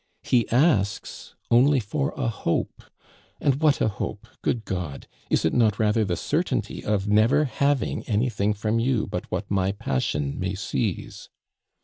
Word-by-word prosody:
He 120 -2 +2
asks 120 - +1 0.2
only 130 +4 +5
for 140 +7 -2
a 130 - -1
hope 110 -7 -2 0.6
and 140 0 +1
what 150 -3 +4
a - - +2
hope, 105 +1 -4 0.2
good 115 -2 -1
God! 90 -7 -4 0.2
Is - - +2
it 80 - +2
not 110 -4 +3
rather 110 0 +2
the 90 -4 -1
certainty - - -2
of 105 -1 0
never 115 +9 +4
having 140 +2 0
anything 105 -2 +1
from 110 +2 0
you 120 -1 +1
but 90 - -5
what 95 +2 -4
my 95 -1 +1
passion 70 -4 -2
may 95 +1 -2
seize? 95 +1 -3
105 Hz, 150 wpm, -25 LUFS, 95-125 Hz, 0.6 s, only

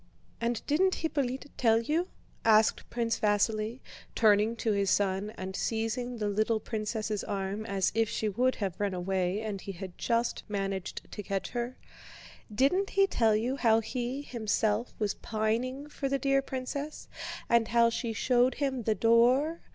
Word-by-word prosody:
"And 235 -1 -1
didn't 370 +6 +2
Hippolyte 280 -5 -2
tell 225 -2 +4
you?" 310 +9 0 0.4
asked 220 -1 +4
Prince 230 -1 -1
Vasíli, 215 +3 +1 0.3
turning 215 0 +4
to 225 -1 0
his 200 -1 +1
son 195 +1 +1
and 190 0 -5
seizing 230 +3 -2
the 210 -2 -1
little 215 +2 +1
princess' 215 -1 -3
arm 200 +2 -3
as 195 -2 +1
if 225 0 +1
she 220 - -1
would 250 +6 +1
have 195 -4 -3
run 200 -2 0
away 185 +2 -1
and 210 -3 -4
he 195 - -6
had 185 0 -8
just 235 0 0
managed 195 -2 -3
to 210 - -5
catch 195 -1 -3
her, 240 +1 -4 0.7
"didn't 280 - +2
he 395 0 +4
tell 225 - +2
you 245 +5 0
how 225 -4 +4
he 245 +4 -3
himself 220 -2 0
was 210 -2 0
pining 235 +6 -2
for 285 -2 -3
the 275 - +1
dear 275 +1 +2
princess, 270 +3 -5 0.4
and 235 -1 +3
how 235 0 +4
she 230 0 -2
showed 245 +3 +2
him 270 -3 -1
the 220 -1 +1
door? 250 +9 +3
225 Hz, 160 wpm, -30 LUFS, 210-255 Hz, 0.7 s, tell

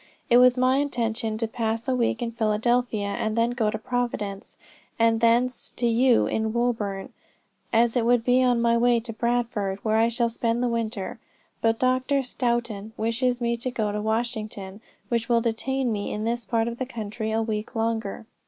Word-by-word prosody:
It 240 - +8
was 250 0 +6
my 255 +1 +3
intention 230 -5 -1
to 225 0 -1
pass 225 +1 -2
a 260 - +2
week 245 0 0
in 230 - -2
Philadelphia 225 0 +1
and 215 +2 -2
then 230 +1 +2
go 235 -3 0
to 220 - -2
Providence, 220 -4 -3 0.4
and 230 0 +3
thence 235 +2 +2
to 240 - -1
you 240 +1 +4
in 220 0 -1
Woburn, 220 -5 -1 0.6
as 230 +1 +3
it 245 - +2
would 240 0 +3
be 250 +1 +4
on 250 -2 +3
my 235 0 +4
way 240 0 +3
to 230 0 -7
Bradford, 230 -4 -1
where 220 0 +2
I 225 +1 +4
shall 235 0 +1
spend 230 +1 -1
the - - +2
winter. 225 -4 -3 0.4
But 225 0 +2
Dr. 255 +2 +1
Stoughton 235 -4 -2
wishes 245 +3 0
me 235 -1 0
to 250 +2 -3
go 220 -4 -1
to 210 0 -2
Washington, 215 -3 -3 0.3
which 235 0 -1
will 235 -1 +4
detain 245 +3 -1
me 205 -2 -3
in 210 - -3
this 235 +1 -2
part 230 -1 0
of 235 0 -5
the 260 - -2
country 220 -2 -4
a 225 +1 +1
week 220 +2 -4
longer. 225 -2 -2
230 Hz, 190 wpm, -25 LUFS, 220-245 Hz, 0.6 s, It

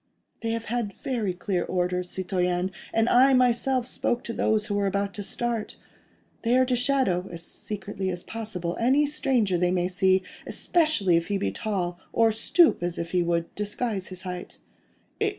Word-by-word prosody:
"They 230 - -2
have 230 0 -2
had 235 -3 -2
very 230 -7 -1
clear 180 0 -2
orders, 180 0 -1
citoyen: 180 0 -1 0.2
and 225 +1 +2
I 260 +2 +6
myself 250 0 +2
spoke 245 -1 -1
to 230 - -5
those 215 -2 +1
who 210 - -3
were 200 -1 +1
about 200 +1 -1
to 210 - -5
start. 235 +1 -2 0.6
They 240 +2 +3
are 255 - +5
to 250 -1 +1
shadow—as 195 -10 0
secretly 195 0 -5
as 175 -1 -4
possible—any 225 +6 0
stranger 250 - +1
they 180 0 +2
may 180 -1 +1
see, 185 0 +2 0.2
especially 305 - +2
if 170 - -1
he 205 - 0
be 95 - -1
tall, 180 - -2
or 225 -1 +4
stoop 315 - +3
as 175 -1 -2
if 170 0 -4
he 180 - +2
would 170 -1 -1
disguise 210 -1 -2
his 185 0 -8
height." 180 -1 -6
200 Hz, 170 wpm, -26 LUFS, 180-235 Hz, 0.6 s, I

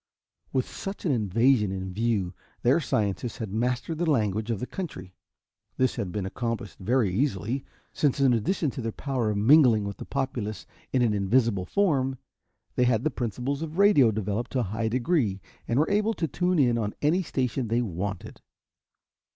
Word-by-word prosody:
With 130 -1 0
such 195 0 -7
an 160 - +2
invasion 115 -1 +2
in 95 -1 -4
view, 105 -4 0 0.3
their 125 +7 +4
scientists 110 - -1
had 110 -6 -5
mastered 125 +7 -1
the 175 -2 +1
language 110 -5 +1
of 115 -4 -1
the - - -3
country. 95 - -7 0.6
This 130 0 +2
had 100 -7 -3
been 100 0 -3
accomplished 115 +1 -4
very 110 -1 +1
easily, 125 +2 -1 0.3
since 145 -2 +1
in 135 -2 +4
addition 135 - 0
to 130 - -6
their 115 0 -2
power 130 -3 -2
of 105 - -1
mingling 120 -1 +6
with 100 0 -5
the - - -7
populace 125 -7 -3 0.3
in 125 - +2
an 115 -3 +2
invisible 100 -1 +2
form, 135 -10 +1 0.6
they 125 - +3
had 120 -2 +2
the 155 - +1
principles 125 +4 -3
of 160 +1 -5
radio 200 - +6
developed 110 +2 -2
to 130 - +1
a 100 -3 -4
high 110 0 -1
degree 120 - +1 0.3
and 120 - 0
were 155 +6 +2
able 210 +2 +2
to 165 - -1
tune 180 +5 0
in 120 -5 +3
on 105 -2 -2
any 165 +6 +3
station 130 -6 -2
they 115 +2 +1
wanted. 95 -1 -5
120 Hz, 180 wpm, -27 LUFS, 105-140 Hz, 0.6 s, mingling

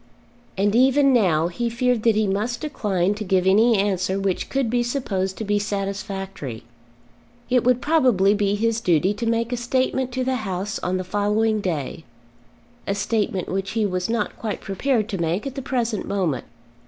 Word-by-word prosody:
And 205 +2 +2
even 270 +2 +5
now, 170 -9 +3
he 235 +7 -2
feared 245 0 +1
that 225 -1 +3
he 215 0 +2
must 215 +5 -1
decline 200 - 0
to 210 +1 -5
give 185 -2 +1
any 220 +4 +5
answer 195 -1 0
which 195 -2 -1
could 270 -2 0
be 240 +2 +1
supposed 205 -7 -2
to - - -4
be 205 0 +1
satisfactory. 195 - -4 0.9
It 250 -2 +4
would 250 0 +2
probably 250 - +4
be 205 -1 +1
his 225 +1 0
duty 180 -1 +2
to 230 +3 -4
make 230 +1 0
a - - -1
statement 255 +1 0
to 255 0 -1
the 260 0 0
House 195 -2 -3
on 180 +1 -1
the 185 - -3
following 210 +3 +1
day, 160 -4 -3 0.8
a 200 - 0
statement 205 -1 -1
which 195 +1 -3
he 220 - +2
was 185 -1 -2
not 225 -2 -2
quite 215 -2 -3
prepared 215 +3 0
to 195 -5 -3
make 170 - -1
at 275 - -4
the 270 - -5
present 240 -5 -2
moment. 175 -10 -1
210 Hz, 180 wpm, -23 LUFS, 190-240 Hz, 0.9 s, even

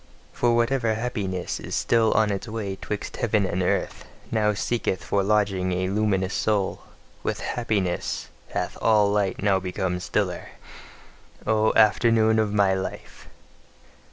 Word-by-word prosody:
For 120 -1 +2
whatever 115 -1 +1
happiness 105 -6 -3
is - - -5
still 115 -2 +2
on 110 -1 +3
its 100 +2 -4
way 105 -3 -4
'twixt 105 +2 -5
heaven 110 -5 +1
and 95 0 -1
earth, 90 - -1 0.3
now 105 -2 +2
seeketh 95 -4 -1
for 100 - +1
lodging 100 -2 +1
a 95 +1 -1
luminous 100 -2 0
soul: 105 -3 0 0.4
WITH - - -3
HAPPINESS 105 -7 -2 0.2
hath - - -3
all 105 -2 +4
light 100 -2 0
now 100 -2 +3
become 90 -1 -2
stiller. - - -2 0.9
O 110 0 +3
afternoon 110 +1 +4
of 110 -2 +1
my 100 -2 +3
life! 95 0 -6
105 Hz, 135 wpm, -25 LUFS, 95-110 Hz, 0.9 s, all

